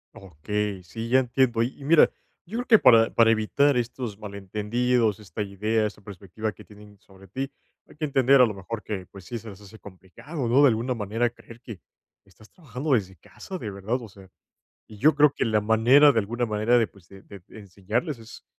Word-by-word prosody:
Okey, 100 +1 -4
sí, 115 +6 -7
ya 130 - +5
entiendo. 125 -2 +1
Y 125 - -4
y 140 - -12
mira, 160 +2 +5 0.4
yo 215 +7 -6
creo 245 - -4
que 220 -3 +6
para 115 -2 +5
para 115 -1 +4
evitar 125 +5 +2
estos 120 -3 -4
malentendidos, 105 +3 -1
esta 105 0 -7
idea, 105 +3 -1
esta 105 - -6
perspectiva 100 +2 -6
que - - -15
tienen 105 -1 -17
sobre 95 -1 -19
ti, 135 +8 -5 0.4
hay - - -18
que 155 +1 -3
entender 135 -1 +4
a - - +7
lo 110 - -3
mejor 105 +3 -7
que, 95 -4 -5
pues, 95 -3 -14
sí 120 - -5
se 110 0 -10
les 100 +1 -13
hace 105 +2 -14
complicado, 105 - -8
¿no?, 130 +5 +4
de 145 - +7
alguna 120 +2 -1
manera, 115 +2 -1
creer 115 0 -16
que 110 -6 -10 0.5
estás 105 +3 -21
trabajando 140 -2 -4
desde 95 -5 -1
casa, 190 - -10
de 110 - -6
verdad, 105 +6 -3
o 115 - -10
sea, 95 -1 -17 0.6
y 105 - -14
yo 150 +7 +4
creo 150 -1 +4
que - - -1
la 110 -1 +1
manera 120 +7 +5
de 115 - 0
alguna 120 +4 -3
manera 110 +3 +1
de, 115 - +2
pues, 95 -4 -22
de 95 0 -15
de 100 -3 -13 0.2
enseñarles 105 - -4
es, 115 0 -13
110 Hz, 210 wpm, -25 LUFS, 100-125 Hz, 0.6 s, a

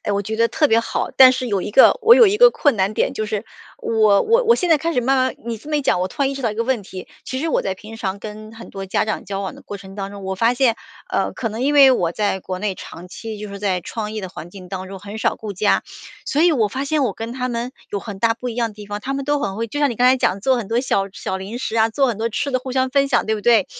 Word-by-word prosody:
哎， 205 - -1
我 200 0 0
觉 220 +2 -4
得 230 0 +3
特 300 -3 +2
别 225 - +4
好。 - - -3
但 260 -1 +9
是 255 -1 -3
有 200 -3 0
一 - - -5
个 265 - +6
我 450 +2 +8
有 475 - +7
一 410 +1 +2
个 - - +7
困 290 - +1
难 195 +2 0
点， - - 0
就 215 - -3
是 210 0 -3 0.3
我 215 -3 +3
我 465 +2 +3
我 465 - +5
现 360 -6 -1
在 315 - +6
开 330 +3 -2
始 250 - +1
慢 265 +3 +2
慢 260 0 +1
你 235 -1 -3
这 290 - -14
么 300 - 0
一 290 - -1
讲， 180 - +1
我 185 - -1
突 280 - -3
然 270 - +2
意 - - -4
识 270 - -6
到 230 - +1
一 - - -6
个 230 - -1
问 250 -4 0
题。 185 -1 -9 0.2
其 260 - -4
实 325 - -1
我 - - +1
在 190 -1 -2
平 215 +3 -11
常 200 -2 -3
跟 215 +1 -9
很 230 0 -11
多 195 0 -7
家 190 - 0
长 215 - -3
交 195 -1 -4
往 195 - -5
的 - - -14
过 205 - -7
程 195 -1 -12
当 195 -1 -5
中， 200 -1 -10
我 190 0 -2
发 230 +5 +2
现， 245 -3 +2 0.3
呃， - - 0
可 225 - -3
能 225 +4 -5
因 290 +2 +1
为 275 -2 +8
我 175 -9 +1
在 205 -1 -1
国 185 0 -5
内 200 -1 -2
长 180 0 -10
期 220 +3 -7
就 210 0 -7
是 200 0 -8
在 190 -3 -1
创 215 +4 -5
意 215 - -4
的 190 - -6
环 175 -2 -10
境 185 -1 -12
当 190 0 -6
中 195 0 -8
很 205 +2 -8
少 - - 0
顾 215 -2 -6
家， 200 +2 +1 0.4
所 295 - +1
以 345 0 +5
我 225 -8 +2
发 265 +6 -4
现 300 +1 0
我 240 -7 0
跟 225 +3 -6
他 255 0 -3
们 240 +2 -3 0.2
有 200 - -2
很 200 -2 -8
大 225 +2 +2
不 245 +2 -6
一 230 - -5
样 230 -2 -1
地 205 0 -11
方。 205 0 -5
他 270 +5 -4
们 275 0 -3
都 290 +1 +1
很 195 -7 -3
会 230 - -2
就 290 +7 -5
像 285 - +3
你 235 - -5
刚 250 - +3
才 260 - +5
讲 200 -6 0
做 260 +4 +2
很 225 -5 -4
多 235 +2 +1
小 195 -6 0
小 190 - -4
零 200 +6 -6
食 230 - -3
啊， 220 0 +4
做 270 +4 +2
很 235 - -1
多 230 - 0
吃 255 +5 -2
的 255 - +1
互 260 +1 -7
相 260 0 +1
分 275 0 +2
享 - - +1
对 220 - +1
不 210 - -4
对？ 225 -2 +4
225 Hz, 350 characters per minute, -20 LUFS, 200-260 Hz, 0.4 s, 但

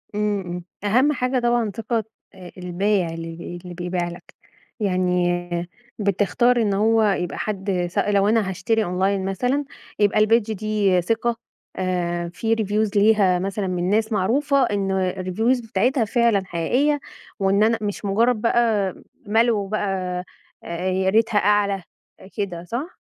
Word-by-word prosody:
إمم، 210 -1 0
إمم 175 0 -5 0.2
.أهم 255 +9 +3
حاجة 255 -1 0
طبعًا 240 -3 +1
ثقة 225 0 -1 0.5
البايع 180 0 0
اللي 165 +1 -7
اللي 180 -1 -8
بيبيع 175 0 -2
لك، 175 - -12 0.5
يعني 175 -2 0 0.3
بتختار 215 +5 +2
إن 205 -2 +1
هو 220 +2 +3
يبقى 190 -4 0
حد 190 -4 -2
س 185 - -10
لو 200 0 +2
أنا 215 -3 +2
هاشتري 215 +4 0
أونلاين 190 +2 0
مثلًا 250 +9 0 0.3
يبقى 205 +1 +3
الpage 225 +1 +3
دي 205 -3 +1
ثقة 230 +5 0 0.4
آآ، 175 -2 -1
في 225 0 0
reviews 210 -1 0
ليها 200 -4 +4
مثلًا 195 +1 -2
من 180 0 -1
ناس 220 +2 +1
معروفة 270 +8 +2
إنّه 195 -4 0
الreviews 220 +7 0
بتاعتها 235 +4 +1
فعلًا 225 -3 +2
حقيقيّة 255 - +1 0.4
وإن 195 +1 +3
أنا 225 +1 +3
مش 205 0 -4
مجرّد 225 +3 +2
بقى 225 -5 +2 0.3
مَلْو 220 -2 +2
بقى، 190 -3 -2 0.4
يا 185 +2 -1
ريتها 220 +1 +2
أعلى 200 -2 +2 0.5
كده 180 -4 -3
صح؟ 245 - -5
205 Hz, 135 wpm, -22 LUFS, 185-225 Hz, 0.5 s, ليها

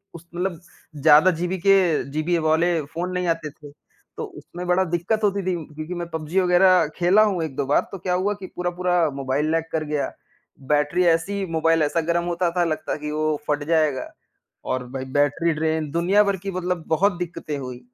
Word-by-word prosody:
उस 170 - -11
मतलब 180 -2 -2 0.4
ज़्यादा 155 +5 +6
जीबी 180 +2 -1
के 195 - +8 0.4
जीबी 155 +4 0
वाले 165 +1 +2
फ़ोन 170 +5 -4
नहीं 180 0 -1
आते 165 -2 -1
थे। 145 0 -14 0.5
तो - - -3
उसमें 180 +1 -8
बड़ा 180 +1 +3
दिक्कत 185 +6 -1
होती 200 -1 +1
थी 185 - 0 0.2
क्योंकि 155 +3 -5
मैं 175 0 -4
पबजी 160 +3 -1
वगैरह 185 0 +4
खेला 185 +5 +4
हूँ 190 -6 0
1-2 140 -2 -3
बार, 140 - +3
तो 195 - -6
क्या 180 +1 -2
हुआ 190 +3 +1
कि 195 -2 -9
पूरा-पूरा 175 -2 0
मोबाइल 140 +3 -1
लैग 165 0 +1
कर 160 -1 -1
गया, 150 -1 -2 0.5
बैटरी 150 +5 +1
ऐसी 185 +4 +1
मोबाइल 165 0 +2
ऐसा 165 +3 +1
गरम 170 +1 0
होता 175 0 0
था 175 - +4
लगता 155 -1 -2
कि 150 0 -5
वो 155 0 0
फट 145 0 0
जाएगा। 155 -5 +1 0.5
और 130 -1 -2
भाई 130 0 -5
बैटरी 145 +4 +2
ड्रेन 155 0 -1
दुनिया 180 +6 +3
भर 200 -1 0
की 195 - -3
मतलब 180 -2 -2
बहुत 180 +4 +2
दिक्कतें 165 -4 -5
हुई, 125 -2 -7
170 Hz, 190 wpm, -23 LUFS, 155-180 Hz, 0.5 s, के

